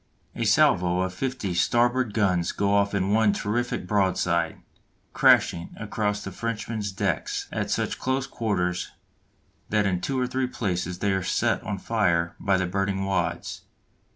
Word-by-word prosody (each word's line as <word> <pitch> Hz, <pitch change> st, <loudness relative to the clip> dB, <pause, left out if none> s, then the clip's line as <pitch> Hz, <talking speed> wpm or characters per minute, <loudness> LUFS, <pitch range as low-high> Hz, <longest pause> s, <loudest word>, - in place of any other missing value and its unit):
A -, -, -2 dB
salvo 90 Hz, 0 st, +3 dB
of 95 Hz, 0 st, -2 dB
fifty 130 Hz, -4 st, -3 dB
starboard 120 Hz, +5 st, +2 dB
guns 90 Hz, -5 st, +2 dB
goes 100 Hz, -, 0 dB
off 100 Hz, 0 st, +2 dB
in 95 Hz, 0 st, 0 dB
one 110 Hz, -1 st, +4 dB
terrific 120 Hz, 0 st, -2 dB
broadside, 90 Hz, -4 st, +1 dB, 0.5 s
crashing 85 Hz, 0 st, +3 dB
across 105 Hz, -1 st, -2 dB
the 100 Hz, -, -6 dB
Frenchman's 110 Hz, 0 st, -3 dB
decks 95 Hz, -, -2 dB
at -, -, -2 dB
such -, -, -1 dB
close 130 Hz, 0 st, 0 dB
quarters 90 Hz, -8 st, -1 dB, 0.8 s
that 105 Hz, -1 st, +2 dB
in 90 Hz, -2 st, 0 dB
two 135 Hz, -2 st, -1 dB
or 125 Hz, -, +1 dB
three 130 Hz, +1 st, -1 dB
places 90 Hz, -7 st, -2 dB
they 100 Hz, +2 st, 0 dB
are 95 Hz, 0 st, 0 dB
set -, -, 0 dB
on 100 Hz, 0 st, -4 dB
fire 90 Hz, -5 st, 0 dB
by 100 Hz, -2 st, +2 dB
the 95 Hz, -, 0 dB
burning 95 Hz, +1 st, -1 dB
wads. 85 Hz, -3 st, -2 dB
100 Hz, 155 wpm, -25 LUFS, 90-110 Hz, 0.8 s, one